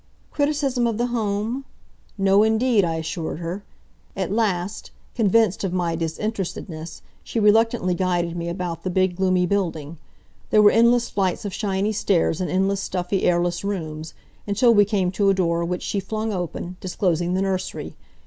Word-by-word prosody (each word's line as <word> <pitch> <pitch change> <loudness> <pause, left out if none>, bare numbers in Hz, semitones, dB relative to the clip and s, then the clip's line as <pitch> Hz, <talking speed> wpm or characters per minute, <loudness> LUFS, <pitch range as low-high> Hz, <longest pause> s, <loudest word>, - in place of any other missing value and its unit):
Criticism 285 -4 +1
of 225 -2 -1
the 240 - +1
Home? 220 +4 -1 0.5
No 195 +1 +4
indeed, 220 0 +3
I 165 -2 0
assured 160 0 -4
her. 175 +4 -5 0.5
At 190 -1 -2
last, 205 -2 -1 0.2
convinced 220 -3 +2
of 190 -2 -1
my 175 -2 0
disinterestedness 165 -1 -4 0.2
she 230 - -3
reluctantly 220 -2 +3
guided 175 -1 0
me 170 0 -3
about 175 -1 -4
the 185 - -1
big, 185 0 +1
gloomy 185 -1 +2
building. 170 -5 -2 0.5
There 215 - +5
were 205 - +8
endless 235 +1 +4
flights 190 -1 -1
of 200 - -4
shiny 200 0 -1
stairs, 185 -4 +1
and 180 - -1
endless 195 +1 +1
stuffy, 185 +1 -1
airless 175 0 +1
rooms, 160 -6 -4 0.3
until 230 +4 +4
we 205 -2 +6
came 195 -3 0
to 200 +1 +2
a 195 - +3
door 170 -2 +1
which 180 +1 -3
she 200 - -1
flung 215 +3 -3
open, 180 0 -4
disclosing 180 -1 0
the 190 - +1
nursery. 190 -1 -3
190 Hz, 160 wpm, -23 LUFS, 175-210 Hz, 0.5 s, were